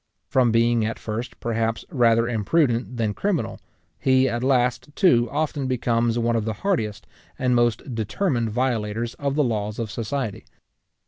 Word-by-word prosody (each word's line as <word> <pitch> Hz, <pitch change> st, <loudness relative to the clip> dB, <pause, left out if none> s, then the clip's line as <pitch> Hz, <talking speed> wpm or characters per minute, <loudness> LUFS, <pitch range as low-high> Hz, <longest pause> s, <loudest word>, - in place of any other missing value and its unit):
From 125 Hz, -3 st, +2 dB
being 115 Hz, 0 st, +3 dB
at 110 Hz, +1 st, -2 dB
first, 115 Hz, +3 st, -5 dB
perhaps, 115 Hz, -1 st, -1 dB
rather 115 Hz, -3 st, +3 dB
imprudent 120 Hz, +1 st, +1 dB
than 110 Hz, -3 st, 0 dB
criminal, 195 Hz, -, -1 dB, 0.4 s
he 130 Hz, 0 st, +3 dB
at 120 Hz, 0 st, -2 dB
last 125 Hz, +1 st, +1 dB
too 120 Hz, -11 st, +4 dB
often 145 Hz, -2 st, -1 dB
becomes 120 Hz, -2 st, +1 dB
one 120 Hz, 0 st, +1 dB
of 115 Hz, -, +1 dB
the 110 Hz, -, -1 dB
hardiest 110 Hz, -, -1 dB, 0.3 s
and 125 Hz, -1 st, +1 dB
most 120 Hz, +2 st, +1 dB
determined 115 Hz, -, -1 dB
violators 115 Hz, -1 st, -1 dB
of 140 Hz, -1 st, -1 dB
the 150 Hz, -, +3 dB
laws 105 Hz, -4 st, -2 dB
of 115 Hz, -2 st, -3 dB
society. 115 Hz, -1 st, -3 dB
120 Hz, 150 wpm, -24 LUFS, 115-130 Hz, 0.4 s, too